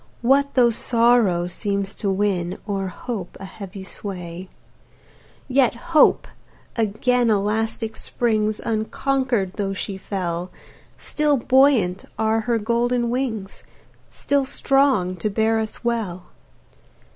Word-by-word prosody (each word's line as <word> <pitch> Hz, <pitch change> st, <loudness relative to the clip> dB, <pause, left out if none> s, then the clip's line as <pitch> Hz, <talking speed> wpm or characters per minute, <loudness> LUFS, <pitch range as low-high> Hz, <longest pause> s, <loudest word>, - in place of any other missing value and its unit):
What 280 Hz, +3 st, +3 dB
though 240 Hz, -2 st, +5 dB
Sorrow 230 Hz, -6 st, +3 dB
seems 200 Hz, +2 st, -3 dB
to 200 Hz, -, -3 dB
win, 190 Hz, -3 st, 0 dB
O'er 195 Hz, -2 st, -2 dB
hope 190 Hz, 0 st, -6 dB
a 195 Hz, -, -7 dB
heavy 195 Hz, 0 st, -9 dB
sway? 180 Hz, -2 st, -7 dB, 1.0 s
Yet 260 Hz, -2 st, +3 dB, 0.2 s
Hope 310 Hz, -, +5 dB, 0.5 s
again 235 Hz, +2 st, +1 dB
elastic 220 Hz, +2 st, -1 dB
springs, 215 Hz, -3 st, 0 dB
Unconquered, 230 Hz, -2 st, -1 dB
though 195 Hz, -2 st, -1 dB
she 195 Hz, 0 st, -4 dB
fell, 180 Hz, -2 st, -4 dB, 0.5 s
Still 300 Hz, -2 st, +1 dB
buoyant 255 Hz, -7 st, +3 dB
are 220 Hz, 0 st, +1 dB
her 235 Hz, -, +3 dB
golden 235 Hz, +2 st, 0 dB
wings, 230 Hz, -6 st, -3 dB, 0.5 s
Still 280 Hz, -1 st, 0 dB
strong 265 Hz, -9 st, +2 dB
to 210 Hz, -, -1 dB
bear 220 Hz, +2 st, +1 dB
us 220 Hz, +2 st, -4 dB
well. 220 Hz, -7 st, -2 dB
220 Hz, 110 wpm, -22 LUFS, 195-245 Hz, 1.0 s, though